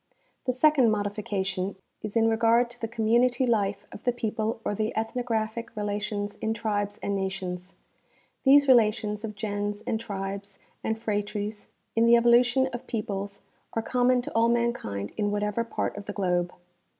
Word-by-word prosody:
The 255 - +2
second 260 -1 +4
modification 200 -2 -1 0.3
is 215 0 -5
in 225 0 +4
regard 230 +2 +3
to 240 - -13
the 225 - -1
community 240 +3 +2
life 205 -4 0
of - - -10
the 245 - +3
people 220 -1 -2
or - - 0
the 215 +2 -2
ethnographic 225 0 -2
relations 205 0 -2
in 220 0 -1
tribes 205 -2 -1
and 200 - 0
nations. 190 -1 -4 0.7
These 280 +1 +6
relations 215 -3 +3
of 215 -2 -5
gens 205 0 -3
and 220 - -1
tribes 200 -2 -5 0.3
and 220 - -1
phratres 210 -1 -3 0.3
in 230 +1 +4
the 235 - +8
evolution 240 +2 +5
of 240 - -6
peoples 200 -3 -4 0.3
are 225 - -1
common 250 +1 +2
to - - -5
all 230 +1 +4
mankind 235 - -1
in 205 -1 +1
whatever 210 +2 0
part 230 - -3
of 205 0 -7
the 205 - -4
globe. 180 -3 0
215 Hz, 160 wpm, -27 LUFS, 205-235 Hz, 0.7 s, the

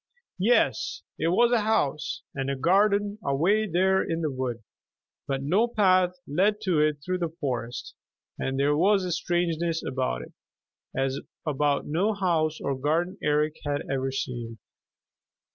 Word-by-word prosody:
Yes, 240 - +2 0.2
it - - +1
was 235 +8 +4
a 240 -2 +3
house 205 -10 0
and 135 0 -3
a 140 - 0
garden 200 +7 +2
away 180 +11 +2
there 190 +3 +3
in 165 0 -2
the 155 -3 -1
wood, 125 -3 -3 0.6
but 135 -1 -2
no 195 +11 +3
path 185 -5 +3
led 195 +8 +1
to 185 -7 +1
it 150 -1 +1
through 185 0 -1
the 165 -2 -3
forest, 125 -5 -3 0.5
and 135 0 -2
there 145 +1 +3
was 195 +4 +3
a 180 - -2
strangeness 170 -1 0
about 130 - -2
it - - -13 0.6
as 135 +1 0 0.3
about 145 -1 +1
no 185 +9 +1
house 165 -5 0
or 140 - -1
garden 165 +7 -1
Eric 150 +1 +1
had 145 0 -1
ever 135 0 0
seen. 120 -3 -4
160 Hz, 150 wpm, -26 LUFS, 140-190 Hz, 0.6 s, was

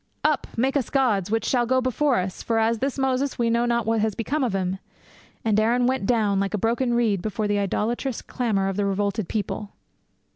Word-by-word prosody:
"Up, 300 -3 +1
make 265 +4 +1
us 270 -5 0
gods, 215 -9 +1
which 225 +1 0
shall 245 -2 +1
go 260 +1 +3
before 255 +2 +1
us; 185 0 -3
for, 230 - -1
as 225 +1 +2
for - - -13
this 270 +2 -1
Moses, 265 +1 0
we 235 -1 +1
know 235 +1 +2
not 235 -1 +1
what 225 -1 +1
is 220 -2 0
become 275 +6 -1
of 240 -6 0
him." 190 0 -1 0.7
And 215 -1 +3
Aaron 240 +3 +2
went 255 -5 0
down 210 -5 +2
like 195 +1 -1
a - - 0
broken 240 +4 +1
reed 220 -6 +1
before 215 +1 -2
the 205 0 +1
idolatrous 230 +6 -1
clamour 215 -6 -1
of 195 0 -2
the 205 - +1
revolted 200 0 -1
people.' 210 -1 -3
225 Hz, 220 wpm, -24 LUFS, 205-250 Hz, 0.7 s, go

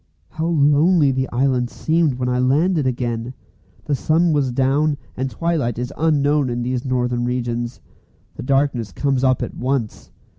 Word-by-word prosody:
How 160 +1 -3
lonely 150 0 +4
the 130 0 -1
island 125 -1 +1
seemed 160 -2 0
when 125 0 -2
I 125 0 0
landed 150 +4 +2
again! 120 -1 -3 0.5
The 145 - -1
sun 160 +5 +2
was 140 -4 +1
down, 140 +4 +1 0.2
and 130 +1 -2
twilight 150 -8 -1
is 125 +3 -4
unknown 145 -3 +2
in 120 0 -2
these 125 0 -2
northern 125 -2 -1
regions. 120 -1 -3 0.6
The - - -7
darkness 135 -5 0
comes 135 +4 -1
up 130 -2 +2
at - - -5
once. 125 -4 -3
130 Hz, 155 wpm, -20 LUFS, 125-150 Hz, 0.6 s, lonely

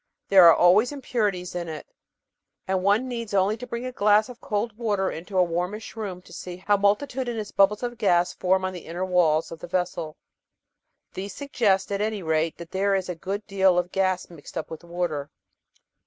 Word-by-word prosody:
There 190 -3 +8
are 165 - +9
always 200 +8 +5
impurities 210 -10 -2
in 175 -1 -4
it, 155 -2 -7 0.8
and 190 -1 0
one 205 +6 +2
needs 235 -4 -4
only 195 +2 +3
to 250 +2 -8
bring 235 +1 -4
a 255 - -3
glass 210 -1 +3
of 245 -1 -11
cold 210 +1 -2
water 205 -4 0
into 180 +4 -6
a 180 - +6
warmish 180 +7 -3
room 195 -5 -5
to 175 - -15
see 180 +1 -7
how 205 +3 +2
multitudinous 225 +2 0
bubbles 205 +3 +3
of 240 -1 -4
gas 175 -5 +2
form 185 0 +1
on 185 - -3
the 180 - -9
inner 175 +3 -3
walls 165 -4 +2
of 165 - -8
the - - -8
vessel. 175 -3 -2 1.0
These 195 +2 -6
suggest, 215 -9 0
at 200 0 -1
any 210 -2 -2
rate, 160 0 0
that 170 0 -10
there 195 +1 +1
is 190 -1 -2
a - - -1
good 195 +5 -4
deal 190 -3 +3
of 180 0 0
gas 185 -1 0
mixed 165 -1 -11
up 160 - -5
with 160 - -6
the 170 - -18
water. 170 -5 -3
190 Hz, 200 wpm, -25 LUFS, 175-210 Hz, 1.0 s, are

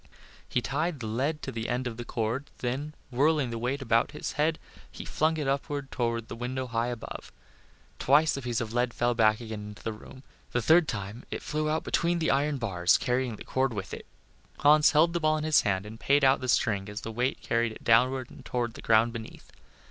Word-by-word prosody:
He 125 - 0
tied 155 +4 -1
the 115 - -5
lead 135 +8 -1
to - - -4
the 115 0 -4
end 125 +1 -1
of 120 -2 -3
the 120 - -5
cord, 120 +4 -3
then 140 +5 -3 0.2
whirling 140 0 +2
the 115 - -4
weight 130 +4 -2
above 115 -2 +2
his - - -5
head, 155 +2 +1 0.3
he - - -9
flung 160 +1 +1
it 150 -3 -2
up 135 +1 0 0.2
toward 115 -2 -1
the - - -7
window 125 +2 -3
high 115 -1 -1
above. 120 -2 -7 0.7
Twice 150 +4 +4
the 140 - -4
piece 120 -2 -2
of 115 -1 -4
lead 120 0 0
fell 120 0 +1
back 110 -2 +3
again 110 -3 -6
into 105 0 -11
the 115 - -2
room; 130 +5 -13 0.3
the 120 - +1
third 160 +6 +5
time 105 +1 -5
it - - -5
flew 155 0 -1
out 155 +1 0
between 170 +1 +1
the 160 -1 +1
iron 145 +1 +1
bars 95 -7 +2
carrying 125 -2 -1
the - - -10
cord 130 -1 0
with 95 -2 -5
it. - - -8 0.5
Hans 150 +1 +6
held 165 +3 +4
the 170 - 0
ball 155 -1 +2
in 155 - -3
his 155 -1 +4
hand 95 -1 -1
and 110 +2 -9
paid 140 0 +3
out 135 0 +4
the 130 - -3
string 100 -4 +1
as 105 +1 -6
the 115 - -5
weight 125 +4 -1
carried 115 -1 0
it - - -13
downward 125 +2 +2
toward 120 -2 -2
the - - -10
ground 115 +1 +3
beneath. 115 -2 -9
125 Hz, 225 wpm, -28 LUFS, 115-145 Hz, 0.7 s, Hans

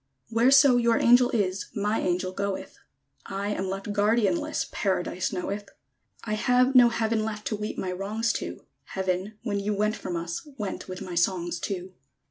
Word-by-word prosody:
_ - - -9
Whereso 260 +3 +6
your 235 -1 +3
angel 245 +1 +5
is, 195 -5 0
My 210 +2 0
angel 185 +1 0
goeth; 200 0 -4 0.5
I 200 +1 -3
am 190 -2 -2
left 195 +2 -4
guardianless, 230 +10 +1
Paradise 185 -2 -1
knoweth! 200 +2 -4 0.5
I 215 - -3
have 250 +4 +3
no 245 -2 +8
Heaven 225 -1 0
left 210 -1 -4
To 215 - -1
weep 210 0 -5
my 185 - -2
wrongs 210 +5 -1
to; - - -5 0.3
Heaven, 190 +2 -1
when 205 -4 -1
you 205 +1 -1
went 210 +2 +1
from 180 -4 -5
us, 170 0 -3 0.2
Went 210 -4 -4
with 185 -1 -6
my 180 - -7
songs 175 0 0
too. 185 -1 -4
205 Hz, 170 wpm, -27 LUFS, 185-230 Hz, 0.5 s, no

